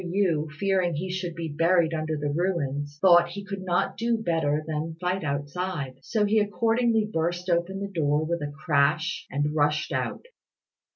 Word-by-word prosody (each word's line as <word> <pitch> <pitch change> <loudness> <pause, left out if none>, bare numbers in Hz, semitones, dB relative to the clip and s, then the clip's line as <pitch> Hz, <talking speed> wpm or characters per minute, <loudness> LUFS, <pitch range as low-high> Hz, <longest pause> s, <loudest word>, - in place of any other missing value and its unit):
Yü, 175 -4 0
fearing 185 0 +1
he 180 +5 -3
should 180 -2 -3
be 165 -1 -4
buried 165 +2 +2
under 155 -1 -2
the 145 0 -2
ruins, 145 -5 -1
thought 175 -1 +6
he 200 +3 -7
could 195 -1 -5
not 175 -1 0
do 230 0 +1
better 160 -7 0
than 160 +1 -3
fight 180 +1 -1
outside; 145 -1 -3
so 215 -3 0
he 215 +2 +3
accordingly 225 +2 +2
burst 175 +3 -1
open 175 +3 0
the 200 - -3
door 155 -5 0
with 170 0 -2
a 145 0 -3
crash 155 +3 +1
and 145 +2 -1
rushed 150 +1 +1
out. - - -2
170 Hz, 170 wpm, -26 LUFS, 150-190 Hz, -, thought